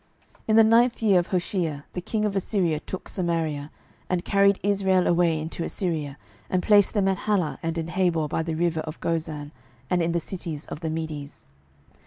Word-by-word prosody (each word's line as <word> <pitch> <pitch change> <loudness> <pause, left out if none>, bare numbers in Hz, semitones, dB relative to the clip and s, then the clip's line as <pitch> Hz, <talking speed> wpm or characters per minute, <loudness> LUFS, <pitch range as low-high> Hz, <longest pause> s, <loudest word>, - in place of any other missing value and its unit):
12:017:006 - - -28
In 215 - +3
the 225 - +8
ninth 230 +2 +4
year 200 -4 +5
of 175 - -2
Hoshea 175 -5 -1
the 180 - -3
king 215 +4 -1
of 205 -1 -1
Assyria 180 -5 0
took 185 - -7
Samaria, 160 -5 -2 0.4
and 180 -1 -1
carried 200 -1 +4
Israel 190 -2 +2
away 170 -2 +3
into 160 +2 -4
Assyria, 155 -7 -3 0.3
and 185 -1 0
placed 205 0 +4
them 200 -2 +2
in 190 - +2
Halah 180 -10 0
and 165 0 -2
in 165 - -1
Habor 170 -2 +1
by 155 - -1
the 160 0 -3
river 170 0 0
of 155 0 -6
Gozan, 155 -3 -3 0.4
and 180 -1 +3
in 170 0 +1
the 170 - +1
cities 165 -3 -6
of - - -7
the 160 -1 -3
Medes. 155 -3 -5
170 Hz, 195 wpm, -25 LUFS, 160-195 Hz, 0.4 s, the